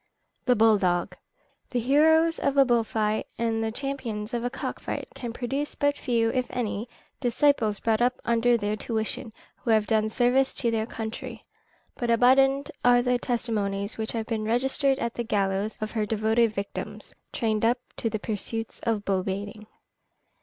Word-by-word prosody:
] - - -48
THE 250 - +5
BULL 220 -1 +5
DOG. 175 -2 0 0.5
"The 245 - -1
heroes 320 +6 +4
of 280 0 0
a 275 - +7
bull 240 -2 +3
fight, 215 -1 -1
and 225 -1 0
the 220 - -1
champions 245 -4 -4
of 235 -1 -1
a 245 - 0
cock 270 - -5
fight, - - -4
can 240 -2 -5
produce 270 +5 -3
but 285 0 +1
few, 230 -5 +1
if 255 -1 -1
any, 230 -1 -3 0.3
disciples 240 -4 +2
brought 225 0 +1
up 250 +1 +2
under 235 +1 +3
their 210 -1 -1
tuition, 220 +1 -3 0.3
who - - -6
have 215 -2 +4
done 215 0 +1
service 250 +4 +3
to 235 -3 +1
their 220 -1 -1
country, 225 -1 -6 0.5
but 240 - -2
abundant 270 +4 +4
are 245 0 +5
the 250 0 +1
testimonies 215 -5 -2
which 220 - -3
have 225 -2 -2
been 220 -2 -2
registered 265 +4 +1
at 235 -3 -2
the 240 - -3
gallows 200 -1 -1
of 215 0 -3
her 215 -2 -1
devoted 220 +1 +2
victims, 200 -1 -5 0.2
trained 220 -2 -1
up 235 +2 +3 0.2
to 225 - -1
the 215 - -2
pursuits 225 +1 -4
of 220 -3 -1
bull 190 -1 +1
baiting." 205 +2 -5
230 Hz, 175 wpm, -26 LUFS, 215-250 Hz, 0.5 s, a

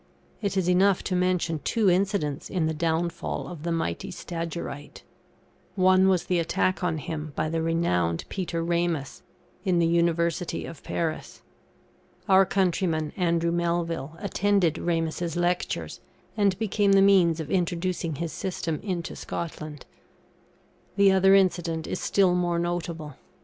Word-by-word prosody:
It 200 -2 -1
is 185 -2 +1
enough 185 +1 +3
to 185 - -1
mention 180 -3 +1
two 220 +6 0
incidents 185 -6 0
in 180 -4 0
the 160 - 0
downfall 165 +2 -2
of 175 -4 -8
the 170 +2 -2
mighty 165 +4 -2
Stagyrite. 170 -4 -6 0.7
One 185 0 +5
was 185 -3 +2
the 180 -1 0
attack 185 +3 0
on 165 -3 0
him 155 0 -5
by 155 - -1
the 165 0 -1
renowned 90 - 0
Peter 170 -3 -3
Rainus, 170 -4 -1 0.4
in 185 -4 +1
the 170 - +3
University 170 +1 0
of 165 - -9
Paris. 160 -2 -4 0.8
Our 190 -1 +6
countryman, 170 -5 0
Andrew 170 -2 +1
Melville, 170 -3 -1
attended 200 -3 +1
Ramus's 165 0 -1
Lectures, 175 0 -1 0.4
and 200 -3 +2
became 205 -1 +2
the 195 0 +6
means 180 -5 +4
of 155 -2 -5
introducing 175 -2 -1
his 165 +2 -4
system 170 -4 -3
into 180 -5 -4
Scotland. 155 -4 -6 1.1
The 200 -1 +5
other 190 +1 +5
incident 175 -4 +1
is - - -3
still 190 -3 +3
more 175 -1 +1
notable. 170 -4 -3
170 Hz, 140 wpm, -26 LUFS, 165-185 Hz, 1.1 s, Our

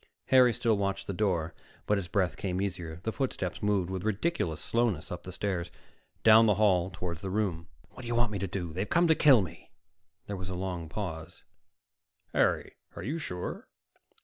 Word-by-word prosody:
Harry 130 -2 +7
still 115 -1 +1
watched 100 -1 -1
the 100 - -3
door, 85 -5 0 0.3
but 105 -1 +2
his 90 - -5
breath 90 -1 0
came 95 -2 -2
easier. 90 -4 -4
The 110 - -1
footsteps 110 - -3
moved 100 -3 +1
with 95 -1 -3
ridiculous 110 - -1
slowness 115 -9 0
up 90 -1 -5
the 90 - -8
stairs, 90 -2 -2 0.5
down 115 0 +8
the 105 - +4
hall 95 -4 +3
toward 85 -2 -5
the 95 +1 -5
room. 95 -4 -1 0.2
"What - - -11
do 120 - -8
you 120 - -1
want 120 -2 +2
me 100 - -3
to 100 - -2
do? 90 -3 -4
They've 95 +4 -3
come 175 +1 +4
to - - +8
kill 135 -9 +6
me." 85 - -10 0.6
There 100 - -4
was 90 0 -5
a 95 - -4
long 90 -3 -4
pause. 80 -5 -6 0.9
"Harry, - - +1 0.2
are - - -6
you 155 +7 -2
sure?" 90 - -5
95 Hz, 195 wpm, -30 LUFS, 90-110 Hz, 0.9 s, down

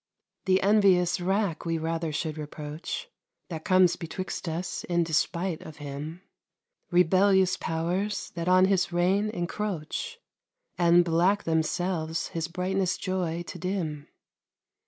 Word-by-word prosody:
The 190 0 +3
envious 190 -4 +4
rack 190 -1 0
we 165 -1 -1
rather 165 0 -2
should 155 0 -2
reproach, 150 - -6 0.4
That 160 -3 -5
comes 185 -3 +4
betwixt 180 +1 -5
us 175 +3 -3
in 175 -1 +1
despite 165 +2 0
of 155 -1 -10
him, 150 +4 -7 0.7
Rebellious 185 +1 +4
powers, 180 +6 -2
that 170 0 -5
on 185 0 +6
his 190 -2 +1
reign 185 +5 +2
encroach, 210 - -3 0.6
And, 175 0 +5
black 175 +5 +2
themselves, 160 +1 -1
his 165 -1 -3
brightness 185 +1 -1
joy 175 -3 -2
to - - -8
dim. 165 -6 -3
175 Hz, 120 wpm, -27 LUFS, 160-190 Hz, 0.7 s, on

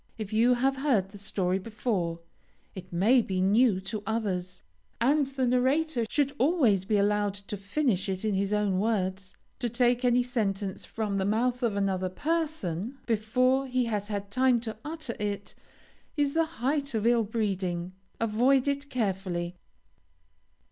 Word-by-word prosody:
If 215 -2 -6
you 235 +3 +4
have 265 +2 +1
heard 250 -9 +1
the 205 0 -11
story 190 -2 0
before, 190 -6 -2 0.5
it 185 -1 -10
may 215 +9 +4
be 190 -4 -2
new 205 +2 +4
to 205 +2 -5
others, 185 -5 -2 0.4
and 280 +4 +3
the 265 -1 -1
narrator 255 +1 +2
should 285 0 +1
always 250 - +3
be 210 +1 +2
allowed 205 0 +1
to 200 +1 -7
finish 200 0 -1
it 190 +2 -2
in 215 - +1
his 195 +1 0
own 205 -3 +1
words. 190 -3 -1 0.2
To 245 -2 -1
take 245 +1 +2
any 245 0 +4
sentence 205 -6 -2
from 210 -3 -2
the 190 - 0
mouth 240 +5 +1
of 230 -4 0
another 190 -2 0
person, 275 - -2
before 255 +4 +2
he 255 -1 +1
has 210 -3 -2 0.2
time 255 0 +3
to 220 -2 -5
utter 310 -5 -4
it, 205 -1 -3 0.6
is 285 -1 +1
the 330 0 +3 0.2
height 280 0 0
of 220 0 0
ill 235 -1 +4
breeding. 190 -5 -2 0.3
Avoid 245 +5 +3
it 280 0 -1
carefully. 190 -7 -2
220 Hz, 155 wpm, -28 LUFS, 195-255 Hz, 0.6 s, you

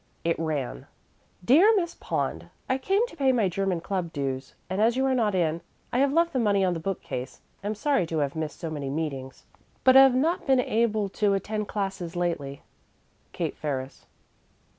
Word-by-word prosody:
It 165 -1 0
ran: 145 - -3 0.6
DEAR 360 - +6
MISS 345 -4 0
POND: - - -3 0.2
I 260 0 0
came 390 - +2
to 485 - -12
pay 275 -4 +3
my 230 -6 +2
German 185 -1 -1
Club 180 -1 -3
dues, 135 -3 -4
and 185 +3 -1
as 230 +3 +3
you 265 - +2
are 265 - +2
not 220 -6 +1
in, 165 -2 0 0.3
I 245 - +2
have 275 0 +3
left 335 +3 +2
the 260 - +1
money 200 -4 +3
on 180 - +1
the 165 - -3
bookcase. 160 -8 -5 0.2
Am 210 +2 -2
sorry 275 - +1
to 160 - -3
have 145 -1 -1
missed 155 -1 -4
so 165 -2 -4
many 145 -3 -4
meetings, 135 -3 -4 0.4
but 260 - +7
have 265 -1 +8
not 315 +7 0
been 265 -1 +4
able 220 -3 +1
to 200 0 +1
attend 210 +1 -3
classes 195 -4 -4
lately. 160 -6 -2 0.7
KATE - - -3
FERRIS. 135 -3 -5
195 Hz, 185 wpm, -26 LUFS, 160-255 Hz, 0.7 s, have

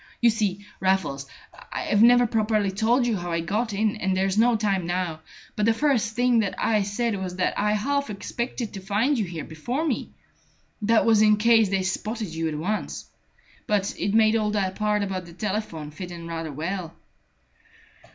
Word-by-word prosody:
You 235 -1 +5
see, 205 -2 -2
Raffles, 185 -8 0 0.4
I've 210 - 0
never 245 +1 +7
properly 215 -3 +1
told 235 +5 +2
you 230 -3 +1
how 175 -1 -5
I 165 0 0
got 215 +7 -1
in, 210 +1 0
and 190 -2 0
there's 190 0 +1
no 230 +2 +4
time 200 -5 0
now; 175 -3 -2 0.4
but 210 0 +1
the 225 - +4
first 235 -6 +1
thing 245 -2 +3
I 215 +2 0
had 200 -2 0
said 205 -1 -1
was 180 -1 -4
that 185 - 0
I 210 +1 +1
half 280 +6 0
expected 235 +3 -4
to 195 - -6
find 205 +9 +1
you 210 - 0
here 170 -3 -6
before 240 - -3
me. 285 -7 -2 0.7
That 220 +2 +3
was 220 -2 +5
in 215 -1 +5
case 225 -1 +4
they 195 -1 0
spotted 215 +3 -3
you 165 0 -1
at 155 - -4
once. 205 +7 -3 0.6
But 205 -1 +1
it 200 +1 0
made 220 0 +5
all 215 -2 +1
that 195 -3 0
part 210 0 0
about 190 -2 -3
the 170 - -12
telephone 190 -6 -4
fit 180 +4 -7
in 170 -1 -8
rather 165 -2 -4
well." 165 +3 -4
210 Hz, 190 wpm, -25 LUFS, 185-225 Hz, 0.7 s, never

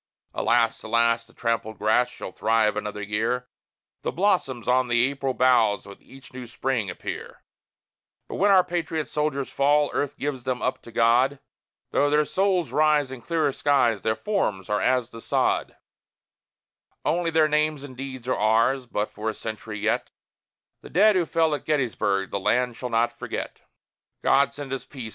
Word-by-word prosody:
Alas! 115 -1 +1
alas! 115 +1 +1
the - - -21
trampled 115 -2 -2
grass 110 +4 +2
shall 125 - -8
thrive 110 +1 +1
another 105 0 -4
year, 115 +5 -1 0.5
The - - -2
blossoms 165 - 0
on 130 0 +3
the 120 +2 +2
apple 135 -2 -3
boughs 120 -5 +3
with 100 - -12
each 135 -1 -16
new 125 -1 -8
Spring 120 -3 -2
appear, 90 - -7 0.8
But - - -6
when 205 +2 +3
our 190 -2 +6
patriot 165 -3 -2
soldiers 150 -3 -2
fall, 145 +1 +2
Earth 145 - -2
gives 140 -3 -3
them 130 -1 -2
up 130 - -2
to 115 - -13
God; 120 +4 +3 0.5
Though 145 - +2
their 150 +1 +3
souls 185 -7 0
rise 150 -1 +2
in 130 -2 -8
clearer 160 0 0
skies, 130 -7 +2
their 110 0 0
forms 105 - -2
are 105 - +1
as 125 -1 +1
the 115 - -10
sod; - - 0 1.3
Only 170 +2 +1
their 160 -1 +3
names 150 -1 0
and 135 -3 -10
deeds 130 -2 -7
are 130 - +1
ours, 115 +5 +2
but, 105 -2 -2
for 110 +1 -3
a 110 - -4
century 110 -1 -6
yet, - - 0 0.7
The - - -12
dead 210 +4 +5
who 175 -3 +1
fell 160 -1 +2
at 145 - -3
Gettysburg 110 -9 0
the 100 - -1
land 125 +4 +1
shall 125 - -5
not 115 +1 +1
forget. - - -6 0.6
God 140 +1 +4
send 140 -2 -7
us 135 - -4
peace! 125 -6 -8
130 Hz, 170 wpm, -25 LUFS, 115-150 Hz, 1.3 s, our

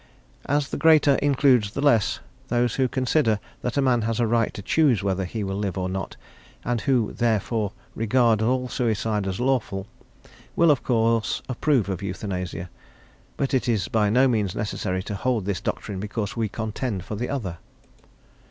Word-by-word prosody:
As 145 0 +1
the - - -3
greater 155 -3 +5
includes 135 -6 +3
the - - -4
less, 130 -8 +2 0.3
those 120 -1 +1
who 130 -1 +1
consider 130 -3 +1 0.2
that 125 +2 -3
a 140 - +3
man 125 -3 +3
has 115 +1 -1
a 120 - +3
right 115 0 +1
to 100 - -7
choose 135 -9 +3
whether 95 -1 0
he 105 +4 -4
will 95 0 -3
live 100 -2 -2
or 90 -1 -1
not, 95 0 -5 0.5
and 120 -2 0
who 125 -6 +1
therefore 110 -2 0 0.2
regard 115 0 +2
all 125 +3 +1
suicide 110 -4 -1
as 95 -1 -3
lawful, 120 -7 0 0.7
will, 170 -2 +5
of 140 - +1
course, 115 -2 +1
approve 130 -3 +1
of 95 -3 -3
euthanasia; 90 -2 -4 0.7
but 140 -1 -1
it 130 -2 +1
is 105 -6 0
by 105 -2 +2
no 130 +5 +4
means 105 -7 0
necessary 95 -3 -2
to 105 - -5
hold 110 0 -1
this 100 -3 -2
doctrine 100 -2 -4
because 105 +1 -4
we 115 -2 -1
contend 110 -2 -3
for - - -6
the 120 +4 -3
other. 95 -12 -4
115 Hz, 175 wpm, -24 LUFS, 100-125 Hz, 0.7 s, greater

